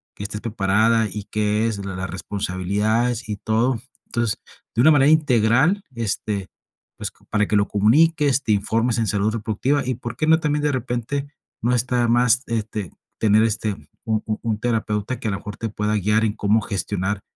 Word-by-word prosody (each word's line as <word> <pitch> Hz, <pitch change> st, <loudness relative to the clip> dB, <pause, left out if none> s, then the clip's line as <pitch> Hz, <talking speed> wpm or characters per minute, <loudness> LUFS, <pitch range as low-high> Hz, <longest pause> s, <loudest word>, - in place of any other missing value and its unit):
que -, -, -7 dB
estés 105 Hz, +1 st, -5 dB
preparada 110 Hz, +1 st, +2 dB
y 105 Hz, +2 st, -5 dB
qué 105 Hz, +1 st, +1 dB
es 100 Hz, -3 st, -3 dB
la 95 Hz, -1 st, -5 dB
las 95 Hz, 0 st, -4 dB
responsabilidades 105 Hz, +6 st, -1 dB
y 105 Hz, -, -2 dB
todo. 115 Hz, +3 st, 0 dB, 0.3 s
Entonces, 120 Hz, -3 st, -1 dB, 0.4 s
de 115 Hz, -, +3 dB
una 155 Hz, +5 st, +7 dB
manera 145 Hz, -1 st, +5 dB
integral, 145 Hz, -, +3 dB
este, 105 Hz, -3 st, -2 dB, 0.5 s
pues, -, -, -4 dB, 0.2 s
para 105 Hz, -1 st, +1 dB
que 105 Hz, -, 0 dB
lo 100 Hz, 0 st, +2 dB
comuniques, 140 Hz, +6 st, +3 dB
te 110 Hz, -, 0 dB
informes 115 Hz, +3 st, +1 dB
en 110 Hz, -, 0 dB
salud 105 Hz, +1 st, +1 dB
reproductiva, 115 Hz, +6 st, 0 dB
y 130 Hz, -, 0 dB
por 120 Hz, -1 st, -6 dB
qué 155 Hz, -, 0 dB
no 160 Hz, 0 st, +5 dB
también 150 Hz, -1 st, 0 dB
de 150 Hz, -, +2 dB
repente 130 Hz, +3 st, -3 dB, 0.3 s
no 120 Hz, +2 st, +2 dB
está 125 Hz, +1 st, +1 dB
de 120 Hz, -, +2 dB
más, 120 Hz, +1 st, +4 dB
este, 110 Hz, -4 st, -3 dB, 0.3 s
tener, 110 Hz, 0 st, +4 dB
este, 110 Hz, -1 st, 0 dB, 0.3 s
un 110 Hz, -1 st, 0 dB
un 110 Hz, -1 st, -2 dB
un 110 Hz, -3 st, -1 dB
terapeuta 110 Hz, 0 st, -1 dB
que -, -, -4 dB
a -, -, -1 dB
lo 100 Hz, -, -2 dB
mejor 105 Hz, +1 st, -8 dB
te 115 Hz, -, -3 dB
pueda 105 Hz, 0 st, -1 dB
guiar 105 Hz, +2 st, +2 dB
en 105 Hz, -, 0 dB
cómo 105 Hz, +1 st, +2 dB
gestionar 100 Hz, 0 st, -2 dB
110 Hz, 190 wpm, -22 LUFS, 105-125 Hz, 0.5 s, una